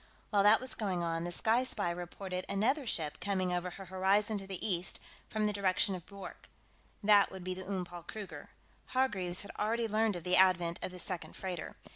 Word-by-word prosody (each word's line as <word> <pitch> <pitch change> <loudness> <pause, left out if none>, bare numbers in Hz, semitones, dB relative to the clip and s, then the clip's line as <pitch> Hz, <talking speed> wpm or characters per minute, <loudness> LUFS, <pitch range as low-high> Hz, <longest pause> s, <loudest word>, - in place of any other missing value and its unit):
While 205 -2 +4
that 210 +2 +7
was 255 +1 -3
going 185 -5 -1
on, 165 0 -1
the 175 - -3
Sky 225 +7 +2
Spy 205 -8 +1
reported 180 +1 -5
another 255 +8 +1
ship 155 -7 -2
coming 185 -1 0
over 180 0 -1
her 195 +2 -9
horizon 195 +3 +2
to 195 - -8
the 195 +2 -2
east, 180 -2 0 0.3
from 215 -1 0
the 210 - +1
direction 195 -1 +2
of 180 -3 -7
Bwork. 200 -1 -10 0.5
That 205 -1 +6
would 190 -1 -7
be 185 0 -2
the 185 +1 -7
Oom 190 -2 -1
Paul 175 0 -9
Kruger. 200 +4 -8 0.5
Hargreaves 190 -9 +2
had 200 - -9
already 225 +2 +1
learned 215 -1 +2
of 175 - -6
the 180 +1 +3
advent 175 -2 +4
of - - -2
the 180 - -9
second 180 0 -4
freighter. 185 -3 -5
190 Hz, 205 wpm, -33 LUFS, 180-210 Hz, 0.5 s, that